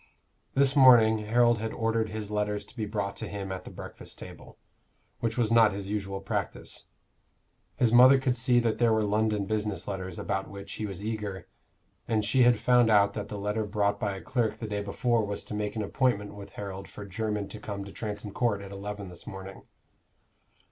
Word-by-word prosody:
This 135 0 +4
morning 120 -5 +7
Harold 120 +2 +3
had 110 +1 -3
ordered 115 -1 0
his 105 -1 -5
letters 105 0 -1
to - - -16
be 110 -3 -3
brought 100 -2 -2
to - - -4
him 100 -1 -5
at 95 -1 -5
the - - -7
breakfast - - -10
table, - - -11 0.6
which 115 0 -2
was 115 -2 +1
not 115 -3 +6
his 100 0 -5
usual 100 -2 -3
practice. 95 - -4 0.9
His 120 -2 +2
mother 130 +3 +8
could 130 -2 0
see 120 0 +3
that 115 -2 0
there 120 -1 +4
were 110 -1 +2
London 105 0 +1
business 105 0 -2
letters 95 -3 -4
about 95 0 -2
which 100 0 -9
he 110 - -4
was 100 +1 -6
eager, 105 -5 -4 0.6
and 110 -2 +1
she 130 +5 +3
had 120 -1 +6
found 120 0 +4
out 100 -2 +5
that 105 - -4
the 105 - -5
letter 105 +2 -1
brought 100 -1 0
by 100 -2 -1
a 95 - -7
clerk 120 -5 0
the 115 - -6
day 105 -1 -2
before 115 +3 0
was 100 0 -4
to - - -8
make 105 0 -2
an 110 - -1
appointment 105 -2 0
with 100 -1 -11
Harold 100 -1 -6
for 105 - -9
Jermyn 105 +1 -2
to 110 - -8
come 100 -2 -5
to 100 - -9
Transome 105 -1 -5
Court 105 -3 0
at 100 - -9
eleven 100 0 -6
this 90 -2 -11
morning. 95 0 -9
105 Hz, 205 wpm, -28 LUFS, 100-115 Hz, 0.9 s, mother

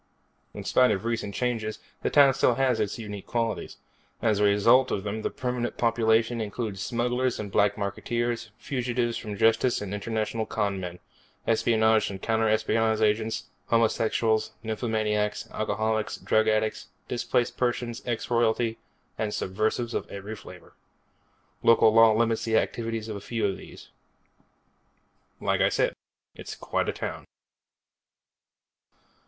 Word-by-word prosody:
In - - -6
spite 125 0 +4
of 95 +3 -1
recent 115 -4 -2
changes, 115 -3 -1 0.2
the - - 0
town 140 -2 +6
still 125 -2 +3
has 130 -3 +2
its 105 -2 -1
unique 105 -4 -7
qualities. 115 -2 -2 0.4
As 110 -3 +1
a - - +3
result 115 +6 +5
of 95 - -2
them 105 +1 -3
the - - -1
permanent 125 -3 -3
population 115 0 +2
includes 105 -2 -4
smugglers 125 +3 0
and 105 -2 -5
black 100 +1 +3
marketeers, 115 +3 -2
fugitives 120 -3 -1
from 105 -2 -5
justice 115 +4 +3
and 105 -1 -5
international 110 +1 -2
con 100 -3 -1
men, 90 -1 -6 0.5
espionage 110 -1 +3
and 95 -1 -6
counter 110 +1 +1
espionage 110 0 +2
agents, 110 +1 +1 0.2
homosexuals, 115 -1 +1
nymphomaniacs, 110 -2 -1
alcoholics, 110 0 -1
drug 110 0 +2
addicts, 110 0 0 0.2
displaced 120 0 0
persons, 120 -1 -1
ex 120 -2 -3
royalty, 115 -1 +1 0.4
and 105 -1 -1
subversives 110 +5 -1
of - - -3
every 100 +2 -6
flavor. 90 -4 -13 0.9
Local 115 -1 +5
law 115 0 +7
limits 115 -1 +1
the 110 -1 +2
activities 115 -1 -2
of 100 -3 -6
few 115 -2 -1
of 95 -1 0
these. - - -13 1.5
Like - - 0
I - - +5
said, - - +1 0.4
it's - - -8
quite - - -2
a - - +2
town. - - -5
110 Hz, 135 wpm, -27 LUFS, 105-120 Hz, 1.5 s, law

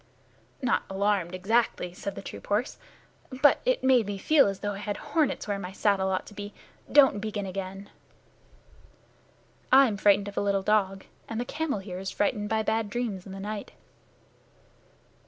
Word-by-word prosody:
"Not 245 - +2
alarmed, 195 -2 0
exactly," 195 -2 0
said 195 +2 -6
the - - -8
troop - - -9
horse, 210 +5 -1 0.6
"but 290 - +6
it - - +1
made 255 -5 +4
me 205 -1 -3
feel 290 +6 +4
as 195 -1 -4
though 205 - -1
I 200 - -7
had 205 0 -3
hornets 300 -4 -1
where 200 -1 -1
my 180 -1 -6
saddle 195 -1 +1
ought 185 -1 -1
to - - -12
be. 205 0 -8 0.4
Don't 270 -8 +6
begin 210 -2 -3
again." 195 +1 -6 1.8
"I'm 260 -5 +6
frightened 200 0 +4
of 200 - -8
a - - +2
little 200 -1 +1
dog, 195 -2 +1 0.2
and 225 - -3
the 245 - -2
camel 305 -1 -2
here 190 -2 -7
is 190 0 -4
frightened 210 0 -1
by 220 0 +1
bad 220 -1 0
dreams 210 -5 -3
in - - -9
the 195 - -7
night." 205 +1 -6
205 Hz, 175 wpm, -27 LUFS, 195-225 Hz, 1.8 s, but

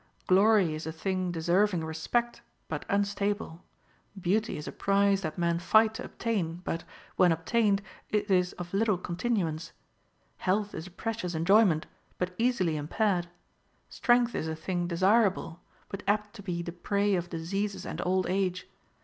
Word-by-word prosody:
Glory 195 -2 +4
is 155 +1 -5
a - - -2
thing 185 +2 -2
deserving• 175 +1 +1
respect, 235 +10 -1 0.3
but - - -4
unstable; 200 -3 -1 0.6
beauty 205 +5 0
is 150 - -7
a - - -4
prize 200 0 +2
that 155 -1 -4
men 170 -1 +1
fight 220 +4 +4
to 225 - -6
obtain, 195 -8 -2
but, 165 -2 -3 0.3
when 180 -1 +5
obtained, 200 +5 +1 0.3
it 210 -1 0
is 180 -1 +3
of 175 0 -8
little 210 -1 +2
continuance; 175 -3 -2 0.6
health 205 +2 0
is 160 - -6
a - - -10
precious 185 -2 -4
enjoyment, 175 -1 +4 0.3
but 180 0 -2
easily 210 -10 +1
im 145 0 -4
paired; 185 -2 +1 0.6
strength 240 -1 +2
is 160 - -2
a 160 - -2
thing 175 +2 -2
desirable, 190 -1 +2 0.3
but 195 - -6
apt 210 0 +1
to 220 - -10
be 175 -3 -3
the 170 - -5
prey 200 +3 0
of 175 -2 -1
diseases 195 +5 -3
and 165 - -4
old 185 +1 +1
age. 185 0 -1
185 Hz, 160 wpm, -29 LUFS, 170-205 Hz, 0.6 s, when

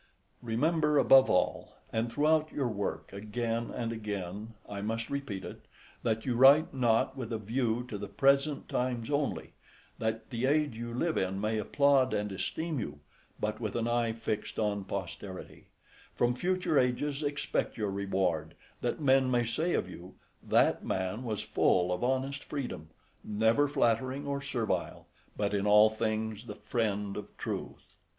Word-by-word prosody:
Remember, 150 +6 +1
above 135 -1 +7
all, - - +1 0.2
and 115 +1 0
throughout 155 +3 +2
your 140 -4 -1
work, 100 -4 -4
again 115 +3 -2
and 115 -1 -3
again, 105 0 -5
I 100 -1 -5
must 115 +2 -3
repeat 135 -9 -4
it, - - -10 0.3
that 110 0 -1
you 125 -3 0
write 140 +6 +6
not 120 -4 +2
with 125 -4 -5
a 115 - 0
view 115 +2 -1
to 105 -4 -5
the 100 - -5
present 140 +4 +2
times 125 -1 -2
only, 140 - -1 0.5
that 110 0 -2
the 120 +2 0
age 145 -3 +2
you 120 +1 -5
live 160 +8 0
in 95 +1 -1
may 110 +1 0
applaud 135 +3 +3
and 105 0 -1
esteem 160 - -2
you, 75 -9 -5 0.4
but 105 0 -2
with 110 -3 -3
an 115 -1 0
eye 120 -1 +1
fixed 110 -1 -4
on 100 -2 0
posterity; 95 0 -6 0.5
from 120 0 +2
future 180 +2 +1
ages 135 +3 0
expect 145 -1 -2
your 105 -3 -1
reward, 95 -5 -1 0.3
that - - -1
men 135 -2 +4
may 120 -1 +2
say 160 +10 0
of - - 0
you, 90 0 -11 0.3
"that - - +3
man 95 +5 -2
was 110 -4 -3
full 90 0 +2
of 90 - -3
honest 130 +2 -1
freedom, 120 - -5 0.3
never 110 +7 +2
flattering 130 +1 +1
or 140 0 -2
servile, 125 -5 -2 0.3
but 105 -1 0
in 100 0 0
all 105 +1 +7
things 110 0 -2
the 105 - -6
friend 105 -2 -2
of 105 - -8
truth." - - -6
115 Hz, 160 wpm, -31 LUFS, 105-135 Hz, 0.5 s, above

